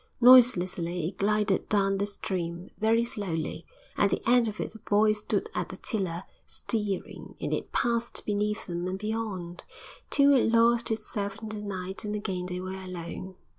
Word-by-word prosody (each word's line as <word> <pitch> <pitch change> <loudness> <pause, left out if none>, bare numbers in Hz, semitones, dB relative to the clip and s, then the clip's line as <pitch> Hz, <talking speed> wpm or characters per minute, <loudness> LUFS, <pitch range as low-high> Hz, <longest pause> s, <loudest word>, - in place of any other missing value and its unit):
Noiselessly 185 -9 +5
it - - -14
glided 210 -1 +1
down 195 -1 +2
the 200 - 0
stream, 175 -3 -4
very 225 +2 +3
slowly; 170 - -3 0.3
at 200 - +4
the - - -2
end 240 -1 +5
of 215 0 -5
it - - -3
a 220 - -11
boy 215 +1 +3
stood 215 0 -1
at - - -2
the - - -7
tiller, 185 -6 -3 0.2
steering; 210 -4 -4
and - - -2
it - - -3
passed 235 0 0
beneath 210 +1 -1
them 175 0 -3
and 185 +1 -2
beyond, 205 -5 -4 0.5
till 280 0 +5
it 245 -4 +4
lost 235 0 +4
itself 205 -2 -3
in 220 - -5
the 215 -1 -5
night, 190 -1 -4
and 210 0 -3
again 190 -4 -3
they 180 0 -4
were 185 0 -5
alone. 185 0 -7
205 Hz, 170 wpm, -28 LUFS, 185-220 Hz, 0.5 s, Noiselessly